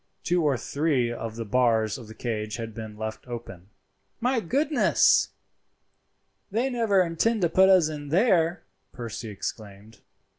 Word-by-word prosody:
Two 175 Hz, -1 st, +1 dB
or 140 Hz, -4 st, +2 dB
three 140 Hz, -2 st, 0 dB
of 115 Hz, -2 st, -5 dB
the 115 Hz, 0 st, -5 dB
bars 115 Hz, -2 st, +2 dB
of 115 Hz, -, -11 dB
the 110 Hz, -, -11 dB
cage 110 Hz, -3 st, -3 dB
had 115 Hz, -1 st, -6 dB
been 110 Hz, -1 st, -8 dB
left 110 Hz, +3 st, -6 dB
open. 105 Hz, -6 st, -8 dB, 0.5 s
"My 245 Hz, +1 st, +1 dB
goodness! 280 Hz, -, +3 dB, 1.2 s
they 235 Hz, +6 st, 0 dB
never 220 Hz, -6 st, +3 dB
intend 180 Hz, +5 st, 0 dB
to 170 Hz, -, +3 dB
put 190 Hz, +3 st, +5 dB
us 185 Hz, -5 st, +5 dB
in 145 Hz, -2 st, -6 dB
there," 175 Hz, -, +2 dB, 0.3 s
Percy 115 Hz, -2 st, -6 dB
exclaimed. 105 Hz, +1 st, -8 dB
130 Hz, 145 wpm, -26 LUFS, 110-185 Hz, 1.2 s, put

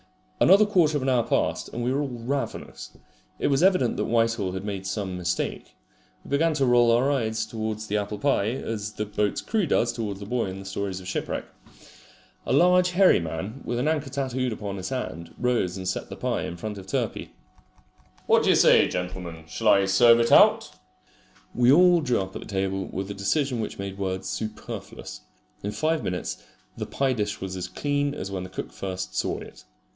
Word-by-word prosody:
Another 200 Hz, +3 st, +6 dB
quarter 170 Hz, -7 st, +3 dB
of 135 Hz, -, -3 dB
an 135 Hz, -, +1 dB
hour 125 Hz, -2 st, +3 dB
passed, -, -, -1 dB
and 120 Hz, -, -4 dB
we 125 Hz, +2 st, +1 dB
were 140 Hz, -, 0 dB
all 145 Hz, -, -1 dB
ravenous. 125 Hz, +2 st, -5 dB, 0.4 s
It -, -, -3 dB
was 140 Hz, +1 st, +2 dB
evident 185 Hz, -10 st, +3 dB
that -, -, 0 dB
Whitehall 115 Hz, -5 st, +1 dB
had 95 Hz, +1 st, -5 dB
made 100 Hz, -2 st, -4 dB
some 95 Hz, -1 st, -3 dB
mistake. 90 Hz, 0 st, -3 dB, 0.5 s
We -, -, -12 dB
began 155 Hz, +3 st, +2 dB
to 140 Hz, -2 st, +2 dB
roll 120 Hz, -1 st, +5 dB
our 125 Hz, +5 st, +3 dB
eyes 110 Hz, -5 st, -1 dB
towards 110 Hz, -1 st, -4 dB
the 105 Hz, 0 st, -1 dB
apple 105 Hz, 0 st, -3 dB
pie, 120 Hz, -4 st, +1 dB
as 110 Hz, -4 st, -4 dB
the 105 Hz, -, -3 dB
boat's 105 Hz, -1 st, -1 dB
crew 215 Hz, -6 st, 0 dB
does 120 Hz, -4 st, +2 dB
towards 105 Hz, -4 st, -4 dB
the 100 Hz, -, -7 dB
boy 120 Hz, +3 st, -1 dB
in 95 Hz, 0 st, -6 dB
the 95 Hz, -, -9 dB
stories 95 Hz, 0 st, -3 dB
of 90 Hz, -, -10 dB
shipwreck. 95 Hz, -, -3 dB, 1.0 s
A -, -, +1 dB
large 180 Hz, +1 st, +5 dB
hairy 185 Hz, +1 st, +5 dB
man, 90 Hz, +10 st, -5 dB
with 120 Hz, -, -3 dB
an 125 Hz, +5 st, 0 dB
anchor 155 Hz, -3 st, 0 dB
tattooed 130 Hz, -2 st, -2 dB
upon 100 Hz, -2 st, -5 dB
his 95 Hz, -, -5 dB
hand, 85 Hz, -11 st, -5 dB
rose 120 Hz, -7 st, 0 dB
and 95 Hz, -1 st, -5 dB
set 95 Hz, -, -3 dB
the -, -, -6 dB
pie -, -, -2 dB
in 85 Hz, -, -6 dB
front 105 Hz, +2 st, -5 dB
of 95 Hz, -, -12 dB
Turpey. -, -, -3 dB, 0.9 s
"What -, -, +4 dB
d'you -, -, +4 dB
say, -, -, +6 dB
gentlemen, 90 Hz, -2 st, -5 dB
shall 95 Hz, +7 st, -3 dB
I 100 Hz, -2 st, +6 dB
serve 115 Hz, +5 st, +6 dB
it 115 Hz, 0 st, +2 dB
out?" -, -, +6 dB, 0.8 s
We 125 Hz, +1 st, +4 dB
all 175 Hz, +2 st, +6 dB
drew 125 Hz, -5 st, +1 dB
up 95 Hz, 0 st, -5 dB
at -, -, -5 dB
the -, -, -10 dB
table 95 Hz, -1 st, -2 dB
with 95 Hz, +1 st, -5 dB
a -, -, -3 dB
decision 120 Hz, +6 st, 0 dB
which 110 Hz, -, -4 dB
made 100 Hz, 0 st, -6 dB
words 95 Hz, -1 st, -3 dB
superfluous. 105 Hz, +3 st, -6 dB, 0.4 s
In 100 Hz, -, -3 dB
five 155 Hz, +6 st, 0 dB
minutes 90 Hz, -1 st, -3 dB, 0.3 s
the -, -, -5 dB
pie 135 Hz, -1 st, 0 dB
dish 105 Hz, -4 st, -2 dB
was 95 Hz, -1 st, -5 dB
as 90 Hz, -, -4 dB
clean 145 Hz, 0 st, -1 dB
as 95 Hz, -6 st, -5 dB
when 95 Hz, -2 st, -3 dB
the 95 Hz, -, -7 dB
cook 95 Hz, -, -6 dB
first 95 Hz, -1 st, -5 dB
saw -, -, -1 dB
it. -, -, -11 dB
110 Hz, 205 wpm, -25 LUFS, 95-135 Hz, 1.0 s, Another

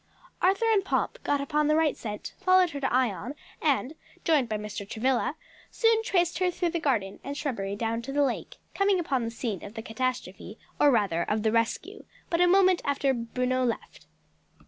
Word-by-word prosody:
Arthur 390 Hz, +5 st, +3 dB
and 395 Hz, -3 st, +3 dB
Pomp -, -, -1 dB
got 285 Hz, -1 st, +1 dB
upon 300 Hz, +1 st, +1 dB
the 305 Hz, -, +3 dB
right 315 Hz, -2 st, +2 dB
scent, 210 Hz, -2 st, -6 dB
followed 370 Hz, -2 st, +4 dB
her 285 Hz, -, -5 dB
to 270 Hz, -, -1 dB
Ion, 245 Hz, -, 0 dB, 0.3 s
and 285 Hz, -2 st, +1 dB, 0.3 s
joined 295 Hz, -8 st, +2 dB
by 215 Hz, -, -1 dB
Mr. 210 Hz, -1 st, -6 dB
Travilla, 255 Hz, +5 st, 0 dB, 0.3 s
soon 455 Hz, -1 st, +3 dB
traced 350 Hz, -6 st, +1 dB
her 365 Hz, -1 st, +2 dB
through 350 Hz, -1 st, -1 dB
the 340 Hz, -, -1 dB
garden 220 Hz, -11 st, -1 dB
and 280 Hz, +1 st, -5 dB
shrubbery 200 Hz, -9 st, -3 dB
down 230 Hz, +2 st, -2 dB
to 260 Hz, +3 st, -6 dB
the 290 Hz, +1 st, +2 dB
lake, 260 Hz, -4 st, -3 dB, 0.2 s
coming 395 Hz, -1 st, +2 dB
upon 275 Hz, -7 st, 0 dB
the 230 Hz, -, -2 dB
scene 225 Hz, -4 st, -4 dB
of 205 Hz, +2 st, -9 dB
the 225 Hz, -, -5 dB
catastrophe, 225 Hz, -4 st, -4 dB, 0.2 s
or 290 Hz, -, +6 dB
rather 205 Hz, -9 st, +2 dB
of 210 Hz, +4 st, -1 dB
the 220 Hz, -, +2 dB
rescue, 230 Hz, 0 st, -1 dB, 0.3 s
but 335 Hz, 0 st, +2 dB
a 355 Hz, -, +6 dB
moment 370 Hz, 0 st, +5 dB
after 280 Hz, -1 st, +1 dB
Bruno 250 Hz, +2 st, -1 dB
left. 235 Hz, -2 st, -4 dB
265 Hz, 190 wpm, -27 LUFS, 225-335 Hz, 0.3 s, or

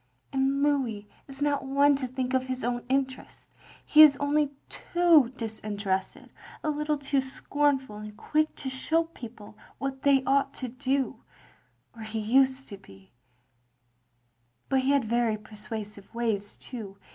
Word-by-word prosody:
"And 270 Hz, +1 st, +1 dB
Lotiis 255 Hz, -8 st, 0 dB, 0.2 s
is 275 Hz, 0 st, -10 dB
not 290 Hz, -1 st, +1 dB
one 280 Hz, +2 st, +4 dB
to 260 Hz, -2 st, -3 dB
think 255 Hz, 0 st, -3 dB
of 260 Hz, -, +3 dB
his 255 Hz, 0 st, -3 dB
own 240 Hz, 0 st, -1 dB
interest. 265 Hz, -1 st, -3 dB, 0.3 s
He 305 Hz, -, +7 dB
is 295 Hz, -2 st, +9 dB
only 290 Hz, 0 st, +1 dB, 0.2 s
too 335 Hz, -8 st, +3 dB
disinterested, 205 Hz, -4 st, -3 dB, 0.3 s
a 310 Hz, -, +1 dB
little 300 Hz, 0 st, -1 dB
too 275 Hz, -1 st, 0 dB
scornful 270 Hz, -3 st, -1 dB
and 210 Hz, 0 st, -9 dB
quick 310 Hz, 0 st, 0 dB
to 265 Hz, -, -4 dB
show 320 Hz, +5 st, +1 dB
people 235 Hz, -10 st, -11 dB, 0.2 s
what 270 Hz, -1 st, -4 dB
they 275 Hz, -2 st, +4 dB
ought 275 Hz, +1 st, +1 dB
to 255 Hz, -, -5 dB
do 265 Hz, +2 st, -1 dB, 0.4 s
— -, -, -38 dB
or 225 Hz, -, -11 dB
he 220 Hz, 0 st, -5 dB
used 260 Hz, +5 st, +2 dB
to 200 Hz, -, -8 dB
be; 95 Hz, -, -18 dB, 1.6 s
but 265 Hz, -, +3 dB
he 260 Hz, +1 st, 0 dB
had 280 Hz, -4 st, +3 dB
very 230 Hz, -1 st, +1 dB
persuasive 210 Hz, -1 st, -8 dB
ways 215 Hz, -4 st, -2 dB
too. 210 Hz, -6 st, -8 dB
260 Hz, 150 wpm, -28 LUFS, 220-280 Hz, 1.6 s, is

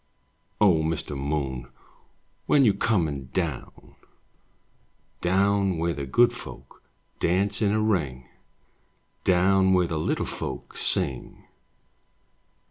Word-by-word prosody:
O 95 Hz, -7 st, +4 dB
Mr. 80 Hz, -2 st, -3 dB
Moon, 70 Hz, -3 st, -3 dB, 0.8 s
When 140 Hz, -3 st, +5 dB
you 105 Hz, -, +5 dB
comin* 80 Hz, -, 0 dB
down? -, -, -4 dB, 1.3 s
Down 95 Hz, 0 st, +2 dB
where 85 Hz, +1 st, 0 dB
the 70 Hz, -1 st, -5 dB
Good 120 Hz, -, +4 dB
Folk -, -, -11 dB, 0.4 s
Dance 100 Hz, +5 st, +1 dB
in 100 Hz, -2 st, +2 dB
a 110 Hz, -, +1 dB
ring, 75 Hz, -13 st, -1 dB, 1.0 s
Down 95 Hz, +1 st, +4 dB
where 90 Hz, -1 st, +3 dB
the 80 Hz, -2 st, -3 dB
Little -, -, -1 dB
Folk -, -, -6 dB
Sing? 65 Hz, -3 st, -1 dB
90 Hz, 105 wpm, -25 LUFS, 75-100 Hz, 1.3 s, When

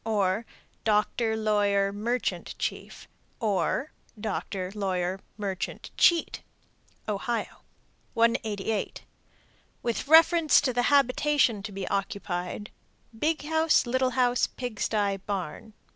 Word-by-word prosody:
Or, 210 Hz, 0 st, 0 dB, 0.4 s
Doctor, 220 Hz, +1 st, +1 dB
lawyer, 205 Hz, -2 st, +2 dB
merchant, 235 Hz, +5 st, -2 dB
chief. -, -, -5 dB, 0.3 s
Or, 225 Hz, +6 st, 0 dB, 0.3 s
Doctor, 195 Hz, -3 st, -3 dB
lawyer, 190 Hz, -2 st, -1 dB, 0.2 s
merchant, 195 Hz, -3 st, -4 dB
cheat. 340 Hz, -1 st, +3 dB, 0.7 s
Ohio. 230 Hz, +3 st, -3 dB, 0.5 s
188. 225 Hz, -2 st, 0 dB, 0.8 s
With 235 Hz, +2 st, -2 dB
reference 325 Hz, 0 st, +6 dB
to 255 Hz, -, 0 dB
the 245 Hz, -, +2 dB
habitation 280 Hz, -4 st, +3 dB
to 210 Hz, +1 st, -7 dB
be 195 Hz, -1 st, -5 dB
occupied: 195 Hz, -1 st, -3 dB, 0.4 s
Big 305 Hz, +6 st, 0 dB
house, 320 Hz, 0 st, +3 dB
little 260 Hz, +1 st, +1 dB
house, 245 Hz, -1 st, +3 dB
pig 245 Hz, -4 st, -6 dB
sty, 205 Hz, -2 st, 0 dB
barn. 195 Hz, +2 st, -5 dB
220 Hz, 100 wpm, -27 LUFS, 200-250 Hz, 0.8 s, reference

